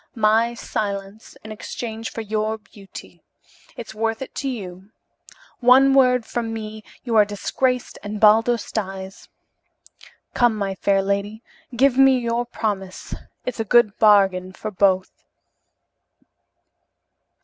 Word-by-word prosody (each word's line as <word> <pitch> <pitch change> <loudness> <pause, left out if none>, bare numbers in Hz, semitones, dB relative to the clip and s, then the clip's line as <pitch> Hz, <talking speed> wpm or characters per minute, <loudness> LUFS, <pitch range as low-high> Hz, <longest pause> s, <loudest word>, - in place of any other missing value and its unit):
My 225 +1 +2
silence 200 -1 -5
in 220 - -9
exchange 225 +1 -6
for 225 - -6
your 215 0 -2
beauty. 205 -2 -14 0.6
It's 230 - -8
worth 225 +2 -2
it - - -12
to 275 - -3
you. 190 -5 -8 0.7
One 260 +2 +6
word 250 -3 +4
from 230 -2 -3
me, 215 -1 -7 0.2
you 235 -3 -2
are 215 - +7
disgraced 250 +5 -2
and 210 0 -6
Baldos 225 +2 +3
dies. 190 -2 -6 1.0
Come, 240 -2 +3
my 200 -2 -2
fair 195 +1 +1
lady, 200 +3 -3 0.3
give 265 +1 +3
me 270 -1 +6
your 235 0 -2
promise, 195 -5 -4 0.3
it's 250 -2 -4
a - - +1
good 220 -1 +3
bargain 195 -3 +4
for 215 +2 -6
both." 190 -1 +1
220 Hz, 125 wpm, -22 LUFS, 200-235 Hz, 1.0 s, are